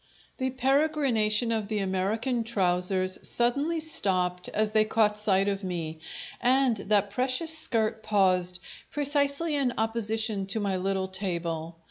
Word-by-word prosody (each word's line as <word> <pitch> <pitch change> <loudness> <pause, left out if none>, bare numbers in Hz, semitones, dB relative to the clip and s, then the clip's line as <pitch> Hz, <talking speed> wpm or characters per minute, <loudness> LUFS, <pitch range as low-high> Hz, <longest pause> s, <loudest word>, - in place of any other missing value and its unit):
The 260 -1 -1
peregrination 260 -5 +1
of 215 -2 -3
the 215 0 -2
American 210 +6 -1
trousers 185 -3 +1
suddenly 280 +8 0
stopped 185 - -1
as 215 0 0
they 215 0 +4
caught 215 -1 +2
sight 200 -2 +1
of 200 0 -2
me, 165 -4 -4 0.4
and 255 -1 +3
that 200 0 +1
precious 255 +8 +2
skirt 225 -8 +1
paused, 185 -4 +1 0.3
precisely 285 +2 0
in 265 -4 0
opposition 220 -2 -1
to 195 +3 -2
my 200 -2 -1
little 190 +1 -1
table. 170 -4 -4
215 Hz, 130 wpm, -27 LUFS, 190-255 Hz, 0.4 s, they